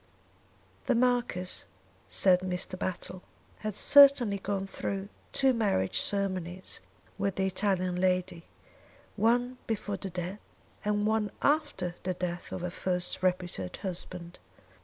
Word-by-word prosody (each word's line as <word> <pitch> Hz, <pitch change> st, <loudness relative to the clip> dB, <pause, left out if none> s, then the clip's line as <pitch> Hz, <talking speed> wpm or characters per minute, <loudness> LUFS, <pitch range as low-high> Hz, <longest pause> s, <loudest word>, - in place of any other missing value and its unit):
"The 255 Hz, -, +3 dB
Marquis," 240 Hz, -7 st, 0 dB, 0.4 s
said 185 Hz, -2 st, +4 dB
Mr. 185 Hz, 0 st, -2 dB
Battle, 185 Hz, 0 st, -4 dB, 0.4 s
"had 215 Hz, -2 st, -4 dB
certainly 270 Hz, -7 st, +7 dB
gone 195 Hz, 0 st, -2 dB
through 195 Hz, 0 st, -4 dB, 0.2 s
two 270 Hz, -1 st, +3 dB
marriage 200 Hz, -, +1 dB
ceremonies 185 Hz, -3 st, -1 dB, 0.4 s
with 200 Hz, -1 st, 0 dB
the 190 Hz, -, +1 dB
Italian 185 Hz, -2 st, 0 dB
lady, 180 Hz, -2 st, 0 dB, 0.7 s
one 245 Hz, +4 st, +2 dB
before 205 Hz, -2 st, -2 dB
the 195 Hz, -, -5 dB
death 180 Hz, +3 st, -4 dB, 0.4 s
and 210 Hz, 0 st, +1 dB
one 215 Hz, -1 st, +1 dB
after 290 Hz, -, +1 dB
the 185 Hz, 0 st, -2 dB
death 180 Hz, 0 st, -4 dB
of -, -, -4 dB
her 180 Hz, 0 st, -3 dB
first 180 Hz, 0 st, -2 dB
reputed 180 Hz, -, -1 dB
husband. 180 Hz, -2 st, -5 dB
190 Hz, 120 wpm, -30 LUFS, 180-210 Hz, 0.7 s, certainly